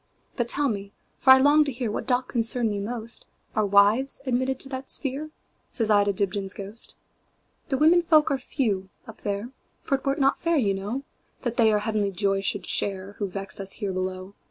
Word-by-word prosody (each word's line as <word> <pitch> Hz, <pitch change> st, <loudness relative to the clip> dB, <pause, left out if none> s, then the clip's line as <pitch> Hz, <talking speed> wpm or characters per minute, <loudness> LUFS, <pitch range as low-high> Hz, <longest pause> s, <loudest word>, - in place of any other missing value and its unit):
"But 240 Hz, -2 st, -1 dB
tell 285 Hz, +2 st, +2 dB
me, 200 Hz, -4 st, -4 dB, 0.3 s
for 265 Hz, -, +1 dB
I 260 Hz, -, +11 dB
long 290 Hz, +3 st, +5 dB
to 280 Hz, -, -2 dB
hearWhat 240 Hz, -4 st, -4 dB
doth 250 Hz, 0 st, +1 dB
concern 230 Hz, -1 st, +4 dB
me 205 Hz, -, -3 dB
most, 230 Hz, +2 st, -3 dB, 0.3 s
Are 215 Hz, -1 st, +1 dB
wives 205 Hz, +7 st, +4 dB
admitted 260 Hz, +1 st, 0 dB
to 270 Hz, -, -4 dB
that 260 Hz, 0 st, -6 dB
sphere?"Says 275 Hz, -5 st, -2 dB
I 205 Hz, -1 st, +5 dB
to 205 Hz, -, +2 dB
Dibdin's 195 Hz, 0 st, -1 dB
ghost."The 215 Hz, +5 st, -8 dB
women 325 Hz, +4 st, +5 dB
folk 310 Hz, -3 st, +3 dB
are 275 Hz, -, 0 dB
few 210 Hz, -8 st, -2 dB, 0.2 s
up 225 Hz, -, -11 dB
there; 205 Hz, +4 st, -3 dB, 0.3 s
For 275 Hz, -, +1 dB
't -, -, -24 dB
were 275 Hz, -, +2 dB
not 275 Hz, -2 st, +2 dB
fair, 335 Hz, -1 st, +1 dB
you 205 Hz, -8 st, +2 dB
know, 205 Hz, +8 st, -4 dB, 0.4 s
That 240 Hz, -2 st, -3 dB
they 225 Hz, -2 st, +5 dB
our 210 Hz, -, +3 dB
heavenly 210 Hz, -1 st, -1 dB
joy 195 Hz, +1 st, 0 dB
should 200 Hz, +1 st, -1 dB
shareWho 200 Hz, +1 st, -2 dB
vex 195 Hz, +2 st, -5 dB
us 195 Hz, 0 st, 0 dB
here 200 Hz, -3 st, -4 dB
below. 185 Hz, +1 st, -4 dB
225 Hz, 190 wpm, -25 LUFS, 200-265 Hz, 0.4 s, I